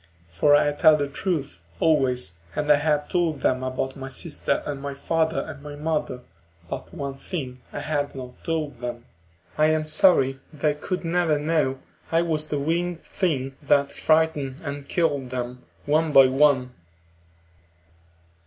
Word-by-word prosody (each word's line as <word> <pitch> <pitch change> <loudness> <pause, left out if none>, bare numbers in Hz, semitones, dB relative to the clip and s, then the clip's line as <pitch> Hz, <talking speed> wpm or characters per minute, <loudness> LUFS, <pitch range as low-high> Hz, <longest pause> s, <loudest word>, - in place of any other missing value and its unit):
For 145 - +4
I 145 0 +3
tell 155 +1 +5
the 145 -1 -1
truth 140 - -3 0.2
always, 125 - +1 0.2
and 150 0 +1
I 145 - +7
had 150 0 +1
told 165 -5 0
them 130 0 +1
about 130 +1 -3
my 135 -1 -7
sister 150 +3 -1
and 140 -2 -4
my 140 0 -5
father 160 +3 0
and 140 - -8
my 145 0 -8
mother. 150 -4 -2 0.5
But - - -6
one 140 -6 -5
thing 130 -8 -5
I - - -5
had 145 -2 -2
not 125 -2 -9
told 155 -6 -2
them. 120 -1 -5 0.5
I 155 - +6
am 155 0 +1
sorry 145 -5 +4
they 150 -1 0
could 180 +4 -4
never 165 -2 +2
know 150 -3 +1 0.3
I 165 +1 +3
was 155 -2 0
the 150 - -2
winged 165 +4 -1
thing 135 -7 -2
that 140 -1 +2
frightened 155 -3 +1
and 140 -1 -6
killed 145 -7 0
them, 125 0 -5 0.2
one 155 +2 +2
by 135 -1 +9
one.... 130 -1 +3
145 Hz, 155 wpm, -24 LUFS, 135-160 Hz, 0.5 s, by